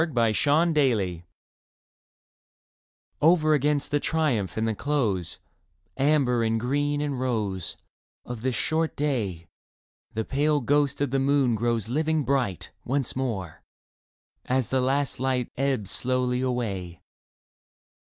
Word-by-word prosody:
2 165 - +2
8 - - -9
Leda 120 - +3
A 110 -1 +3
SUNSET 135 - +2 2.0
OVER 155 -1 +5
against 145 0 +1
the 145 - +2
triumph 140 - 0
and 110 +1 +1
the 110 - 0
close 110 - -1 0.3
— - - -44
Amber 135 -4 +2
and 115 0 +1
green 145 +4 0
and 145 -3 -2
rose 105 -8 -2 0.2
— - - -59
Of 120 -3 -6
this 130 0 -1
short 160 0 0
day, 105 - -2 0.7
The 110 0 -1
pale 145 +2 +1
ghost 145 +2 +1
of 145 -3 0
the 135 - +1
moon 135 -2 +2
grows 115 -1 0
living 155 +4 0
bright 125 - -1
Once 135 -1 -1
more, 110 -11 -3 0.8
as 130 -1 0
the 130 0 +2
last 135 +1 0
light 130 -2 -1
Ebbs 130 -7 -1
slowly 125 0 0
away. 100 -9 -3
130 Hz, 135 wpm, -26 LUFS, 115-145 Hz, 2.0 s, OVER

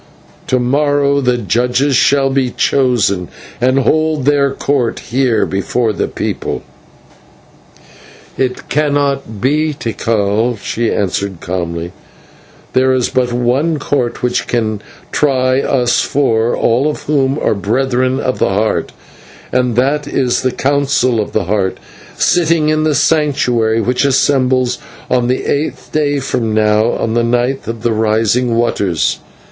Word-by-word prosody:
To 130 - +2
morrow 140 +2 +1
the 125 -2 +1
judges 125 +5 +1
shall 135 +2 +3
be 135 -2 +1
chosen, 120 -9 +1 0.3
and 130 +2 +2
hold 155 0 +1
their 140 -1 +3
court 135 -3 -1
here 120 -3 0
before 110 +4 -1
the - - -2
people." - - -4 1.7
"It 130 -1 -2
cannot 140 -6 -1
be, 150 +5 +1
Tikal," 115 -1 -1
she 115 +3 -2
answered 100 -2 -2
calmly, 85 -1 -4 0.8
"there 130 0 +3
is 125 -2 +1
but 125 -1 0
one 125 +7 +1
court 130 -5 -2
which 125 0 0
can 110 -3 -1 0.3
try 130 -2 +2
us 125 -4 +1
four, 120 -4 +1
all 125 +6 +2
of 150 - -5
whom 140 -2 +1
are - - +1
Brethren 130 +5 0
of 130 - -2
the - - +2
Heart, 105 +3 -1 0.6
and 125 -2 +1
that 140 +4 +1
is 130 -4 0
the 130 - 0
Council 135 -4 +1
of 105 - -2
the 110 - 0
Heart 95 0 -1 0.4
sitting 165 -3 +2
in 155 0 +1
the 155 -2 +1
Sanctuary, 125 -7 +1
which 125 +5 0
assembles 130 -2 +2 0.3
on 125 -1 +2
the 130 +1 -1
eighth 145 +2 -2
day 145 -2 0
from 115 -4 -2
now, 110 +1 +3
on 110 - -2
the 120 0 +1
night 120 +3 0
of 115 -1 -5
the 120 - +1
Rising 110 +3 +1
of 115 - 0
Waters. 100 -8 0
125 Hz, 140 wpm, -15 LUFS, 115-140 Hz, 1.7 s, shall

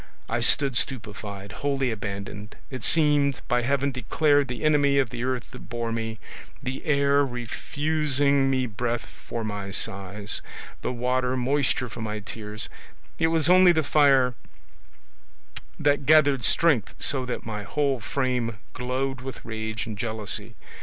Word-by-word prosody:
I 115 - -1
stood 135 +2 +3
stupefied, 105 -6 -4
wholly 135 +3 -1
abandoned, 100 0 -6 0.2
it 130 - -6
seemed, 145 -4 +3
by 125 0 +2
Heaven, 140 +2 +1
declared 145 +3 +2
the 125 +1 -5
enemy 145 -2 +4
of 135 -4 +2
the 120 0 -4
earth 130 -1 -2
that 125 - -11
bore 120 -1 -3
me, 115 -1 -3 0.5
the 130 0 -4
air 140 -2 +3
refusing 140 +2 +1
me 130 -1 +1
breath 120 +1 -2
for 115 - -7
my 100 -2 -4
sighs, 100 +1 -3 0.4
the - - -2
water 125 +1 0
moisture 130 0 +1
for 115 0 -8
my 110 -1 -3
tears; 105 +1 -5 0.5
it 160 - +4
was 160 -2 +2
only 180 0 +7
the 160 -1 +1
fire 135 -4 +4 1.5
that 145 -2 +2
gathered 145 -5 +5
strength 145 - +3
so 135 -2 +1
that 125 - -4
my 105 -2 -4
whole 140 +4 0
frame 125 -2 -1 0.2
glowed 130 +1 -2
with 130 -1 -8
rage 110 -1 -4
and 110 -3 -7
jealousy. 110 -3 -2
125 Hz, 145 wpm, -26 LUFS, 110-140 Hz, 1.5 s, only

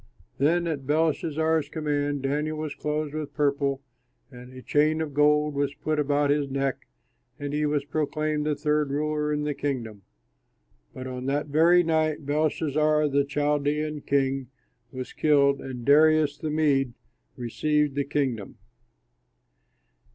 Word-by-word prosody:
Then 170 +5 +2
at 145 -5 -3
Belshazzar's 160 0 +1
command 145 -3 -2
Daniel 150 +3 -1
was 155 -1 -4
clothed 150 0 -3
with 155 -2 -5
purple 140 -2 0 0.5
and 125 0 -12
a 130 0 -11
chain 155 +2 +2
of 155 -3 -3
gold 150 +1 +3
was 140 0 -1
put 155 -1 -2
about 145 0 +2
his 145 -1 0
neck, 135 0 -2 0.5
and 145 0 -5
he 150 0 +1
was 145 -1 -1
proclaimed 155 0 -1
the 150 - +1
third 150 -1 0
ruler 150 +1 -1
in 150 0 -1
the 150 0 -1
kingdom. 125 -7 -4 0.9
But 130 - -8
on 130 0 -5
that 145 +2 -1
very 170 +4 +5
night 155 -2 0
Belshazzar, 150 0 +1
the 140 0 +2
Chaldean 150 +1 -1
king, 135 -2 0 0.4
was 130 -1 -7
killed, 140 -2 +3
and 125 -3 -7
Darius, 155 0 +5
the 155 - -5
Mede, 140 -5 +1 0.4
received 150 +4 0
the 140 +1 0
kingdom. 135 -7 -2
145 Hz, 140 wpm, -26 LUFS, 140-155 Hz, 0.9 s, very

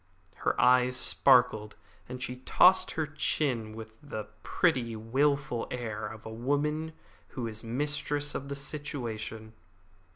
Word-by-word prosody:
Her - - -1
eyes 125 0 +4
sparkled, 125 -6 +4 0.3
and 125 0 -5
she 125 - -4
tossed 180 +8 +4
her 160 - -1
chin 130 -7 -1
with 110 0 -8
the 110 -8 -6
pretty, 130 -10 +1
wilful 135 +3 0
air 110 -4 -4
of 110 +1 -10
a 110 - -6
woman 150 +6 -1 0.4
who 120 - -2
is 110 0 -5
mistress 145 +4 -1
of 140 0 -5
the 140 - -3
situation. 120 -7 -5
125 Hz, 130 wpm, -29 LUFS, 110-145 Hz, 0.4 s, eyes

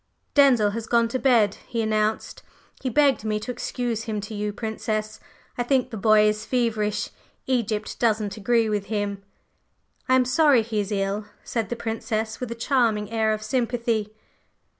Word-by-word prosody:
"Denzil 250 -8 +5
has 225 +1 -5
gone 235 -1 +3
to 255 - -2
bed," 230 -7 +3
he 235 -2 -3
announced. 215 -1 -1 0.4
"He 260 - -1
begged 270 -2 +3
me 215 -1 -1
to 250 - -5
excuse 240 -2 -3
him 215 -2 -2
to 205 +2 -7
you, 210 0 -2
Princess. 215 0 -3 0.4
I - - +3
think 255 0 +1
the - - -5
boy 215 +1 +4
is 210 0 0
feverish. 220 -4 -1 0.3
Egypt 225 -5 -1
doesn't 215 -3 +1
agree 230 +2 +2
with 210 -2 -1
him." 205 -1 -2 0.9
"I 255 - +6
am 255 -1 +4
sorry 260 -1 +4
he 220 -1 -2
is 205 0 -2
ill," 200 +1 -1 0.2
said 230 -3 -2
the 240 - -2
Princess 225 -1 -3
with 250 - -4
a 235 - -4
charming 230 -4 +1
air 220 -1 +1
of 215 0 -2
sympathy. 235 -2 -1
220 Hz, 170 wpm, -24 LUFS, 210-240 Hz, 0.9 s, I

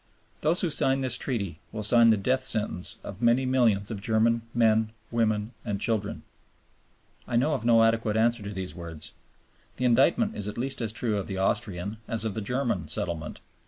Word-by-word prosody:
Those 160 +4 +2
who 175 - 0
sign 135 -1 +2
this 130 -1 +1
Treaty 100 - -3
will 110 - -5
sign 115 +2 +6
the 110 - +4
death 130 +6 0
sentence 105 -7 0
of 100 +1 -8
many 120 +2 +3
millions 115 -6 +2
of 105 -3 -5
German 115 +2 +2
men, 110 -2 +2 0.2
women 110 -1 0
and 105 -4 -3
children." 105 -2 -2 1.0
I - - -2
know 140 +6 +2
of 130 -5 -3
no 115 -1 +5
adequate 115 -1 +1
answer 115 +1 +2
to 100 0 -6
these 95 -2 -5
words. 85 -3 -7 0.6
The 125 - -2
indictment 165 - +3
is 100 - -4
at 105 - -6
least 135 +2 -3
as 110 -2 -1
true 115 -2 -1
of 100 - -5
the 95 - -4
Austrian, 95 +1 -1
as 115 -1 -2
of 110 - -2
the 110 - -4
German, 115 - -1
settlement. 80 +1 -3
115 Hz, 190 wpm, -27 LUFS, 100-120 Hz, 1.0 s, sign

